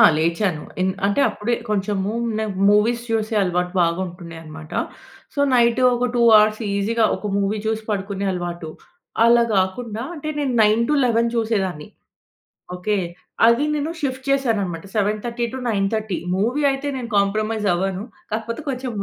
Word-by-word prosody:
ఆ! - - +8
లేచాను. 165 +1 0 0.2
ఇన్ 185 +1 +2 0.2
అంటే 200 +7 +1
అప్పుడే 235 +3 -1
కొంచెము 205 0 -1 0.3
నాకు 215 -3 -3
మూవీస్ 225 +3 +3
చూసే 220 0 0
అలవాటు 180 -1 -1
బాగా 170 0 +1
ఉంటుడె 170 -1 -10
అన్నమాట. 155 0 -11 0.6
సో, 285 - -1
నైట్ 235 0 +4
ఒక 245 +1 0
2 240 - +2
హౌర్స్ 215 +1 +5
ఈజీగా 220 +3 +1
ఒక 210 - -5
మూవీ 200 +1 0
చూసి 220 0 -1
పడుకునే 200 -1 -2
అలవాటు. 175 -2 -5 0.5
అలా 235 0 +6
గాకుండా 210 +4 -1
అంటే 305 -1 -6
నేను 280 -3 0
9:00-11:00 235 +2 +3
చూసేదాన్ని. 195 -9 -1 0.9
ఓకే. 205 +3 -1 0.5
అది 235 +4 +4
నేను 300 +2 -2
షిఫ్ట్ 260 -2 -3
చేశానన్నమాట. 215 -11 0
7:30-9:30 220 -1 -1 0.2
మూవీ 245 +9 0
అయితే 270 +2 -4
నేను 240 -2 -5
కాంప్రమైజ్ 215 +2 0
అవ్వను. 190 +2 -2 0.3
కాకపోతే 225 +4 -3
కొంచెం 255 -1 -3
215 Hz, 135 wpm, -21 LUFS, 195-235 Hz, 0.9 s, ఆ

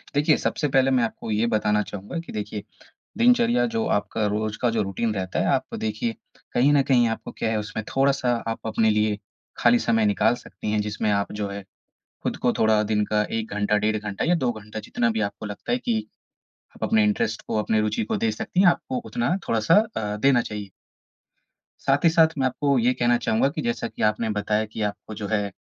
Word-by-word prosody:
देखिए, 150 +1 +4
सबसे 150 - -1
पहले 135 -1 +3
मैं 125 -2 +3
आपको 115 -1 -4
ये 110 +2 +1
बताना 105 -2 +2
चाहूँगा 105 - -6
कि 170 - -9
देखिए 105 0 -5 0.6
दिनचर्या 240 0 +4
जो, 230 -1 -1
आपका 105 - 0
रोज़ 105 +1 -2
का 120 - +3
जो 115 -1 0
रूटीन 105 +3 -2
रहता 95 -2 -3
है, - - +1
आप - - -2
देखिए 110 +1 -2 0.4
कहीं 135 +4 +4
न 145 -1 +5
कहीं 125 -3 +3
आपको 115 - -5
क्या 110 - 0
है 110 - 0
उसमें 105 +1 -5
थोड़ा-सा 135 -2 +2
आप 115 0 -4
अपने 110 0 +2
लिए 105 -1 +1 0.4
खाली 120 0 +5
समय 115 -2 +2
निकाल 105 +3 +3
सकती 120 -3 -7
हैं। 105 - +1
जिसमें 105 +1 -1
आप 100 -1 0
जो 105 -1 -3
है 100 0 -6 0.6
खुद - - -2
को - - +1
थोड़ा 110 -1 +4
दिन 105 0 +1
का 105 0 +1
1 110 -1 -3
घंटा, 105 0 +1
डेढ़ 110 +1 +1
घंटा 105 -1 -3
या 175 - +3
2 130 -7 0
घंटा 110 -1 -8
जितना 115 +2 -1
भी 110 - -2
आपको 100 +1 -3
लगता 105 -1 -6
है 245 - +3
कि 235 -3 -1 0.8
अपने 220 -1 +3
इंटरेस्ट 115 - 0
को, - - -1
अपनी 110 +1 +1
रुचि 105 0 0
को - - -2
दे 115 - +1
सकती 110 +10 -3
हैं, 195 - +6
आपको 255 +8 +1
उतना 235 -7 0
थोड़ा-सा 110 -1 +3 0.2
अ, 105 -1 -2
देना 130 +2 +4
चाहिए। 105 -3 -6 1.2
साथ - - +2
ही - - +8
साथ 160 -1 +5
मैं 135 - +2
आपको 140 +1 +1
ये 120 +2 +3
कहना 120 -1 +2
चाहूँगा 110 +5 +2
कि 145 - -4
जैसा 235 0 -1
कि - - -7
आपने 105 +1 +1
बताया 105 +1 0
कि 110 - -5
आपको 105 +1 -4
जो 105 0 -5
है 105 -1 0
110 Hz, 215 wpm, -24 LUFS, 105-135 Hz, 1.2 s, ही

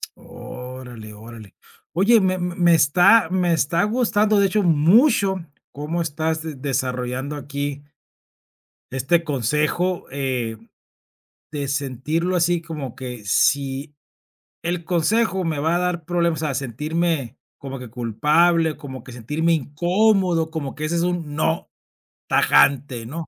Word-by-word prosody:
Órale, 125 -4 -10
órale. 110 -1 -12 0.4
Oye, 205 +7 +5
me 185 -1 +1
me 175 -1 +2
está 175 +6 +5
me 180 -2 +1
está 165 +3 +1
gustando, 215 -2 +2
de 200 - +4
hecho, 210 +2 0
mucho 190 - +3 0.3
cómo 150 +4 -3
estás 160 0 -2 0.2
desarrollando 130 +1 -2
aquí 145 0 -5 1.1
este 135 +7 +1
consejo, 150 +7 0
eh, 130 -5 -2 1.0
de 145 -2 -3
sentirlo 145 +6 -2
así 170 0 +2
como 150 -7 -7
que 125 -4 -7
si 140 +6 +1 0.7
el 170 0 -2
consejo 190 +3 +1
me 160 -3 -2
va 160 +4 +1
a - - +2
dar 180 -2 -2
problemas 170 -1 0
o 155 - 0
sea, 140 - -2
sentirme 150 +1 -2 0.2
como 135 -1 -7
que 125 -1 -9
culpable 150 +8 +2
como 130 -5 -9
que 125 - -11
sentirme 150 +8 -1
incómodo 175 - +1
como 155 -4 -5
que 155 - -5
ese 170 +2 -1
es 170 - +1
un 170 -4 -2
no 160 +1 -1 0.6
tajante, 130 -4 +3
¿no? 160 +6 -6
155 Hz, 130 wpm, -22 LUFS, 135-175 Hz, 1.1 s, Oye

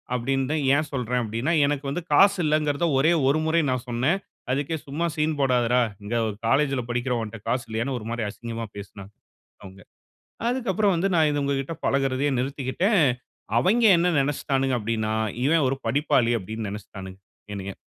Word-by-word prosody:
அப்படின்னு 135 +2 0
தான் 155 -2 0
ஏன் 155 +1 0
சொல்றேன் 125 -2 -1
அப்படின்னா, 115 +9 -1
எனக்கு 145 -1 -2
வந்து 175 +6 -3
காசு 200 +5 +6
இல்லைங்கிறதை 150 +1 +1
ஒரே 160 +5 +4 0.2
1 150 +3 +3
முறை 165 +1 +2
நான் 130 0 -2
சொன்னேன். 130 +11 +1 0.3
அதுக்கே 145 +4 -1
சும்மா 155 +5 -2
சீன் 155 -1 0
போடாதடா. 125 -2 +3 0.2
இங்க 110 +4 -3 0.3
காலேஜ்ல 135 0 +2
படிக்கிற 120 +1 -1
உன்ட்ட 110 +1 -6
காசு 125 +1 -1
இல்லையான்னு 120 +4 -2
ஒரு 110 - -9
மாரி 120 -1 -2
அசிங்கமாக 115 -1 -6
பேசினாங்க, 100 0 -10 0.5
அவங்க. 95 0 -12 0.7
அதுக்கு 245 -5 -1
அப்பறம் 200 -2 +2
வந்து 190 +4 0
நான் 155 -2 +4
இத 145 -1 -1
உங்ககிட்ட 140 +3 -2
பழகுறதையே 135 +1 +1
நிறுத்திக்கிட்டேன். 140 - 0 0.6
அவைங்க 225 - +3
என்ன 175 +1 +2
நெனைச்சிட்டானுங்க 135 -2 0
அப்படின்னா, 110 0 -2 0.3
"இவன் 155 -1 +3
ஒரு 135 - -2
படிப்பாளி" 130 -4 +2
அப்படின்னு 110 +2 -5
நெனைச்சிட்டானுங்க, 100 -2 -9 0.3
என்னய. 100 -1 -6
135 Hz, 160 wpm, -24 LUFS, 115-155 Hz, 0.7 s, காசு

